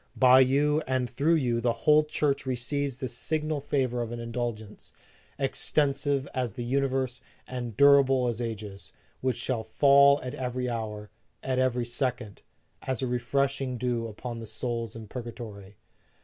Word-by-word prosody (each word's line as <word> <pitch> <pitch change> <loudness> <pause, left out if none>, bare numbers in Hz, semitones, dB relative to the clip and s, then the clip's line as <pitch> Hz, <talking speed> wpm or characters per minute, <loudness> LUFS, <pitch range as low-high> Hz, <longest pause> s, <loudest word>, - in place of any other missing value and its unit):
By 130 0 +7
you 145 +4 +3
and 130 -1 0
through 140 +7 +2
you 120 -6 0
the 120 -1 +2
whole 150 0 +6
Church 145 -3 -1
receives 130 +1 -2
the 130 -1 -3
signal 155 +5 -2
favor 130 -4 0
of 115 -1 -4
an 120 - -5
indulgence, 115 -2 -5 0.4
extensive 140 0 0
as 125 -5 -2
the 120 - -5
universe 130 0 -1 0.3
and 120 -4 -5
durable 135 -3 +5
as 120 0 -2
ages, 105 -4 -6 0.3
which 130 -2 -1
shall 125 -4 -2
fall 140 +5 +5
at 125 - -5
every 125 -1 -3
hour, 110 -3 -4 0.3
at 130 -1 0
every 125 -2 +1
second, 120 -4 -3 0.4
as 130 -1 -3
a - - +2
re 125 0 -1
freshing 135 0 -1
dew 120 -1 -1
upon 115 +2 -7
the 115 - -8
souls 115 0 -2
in 110 -1 -8
purgatory 110 -5 -8
125 Hz, 155 wpm, -28 LUFS, 115-135 Hz, 0.4 s, By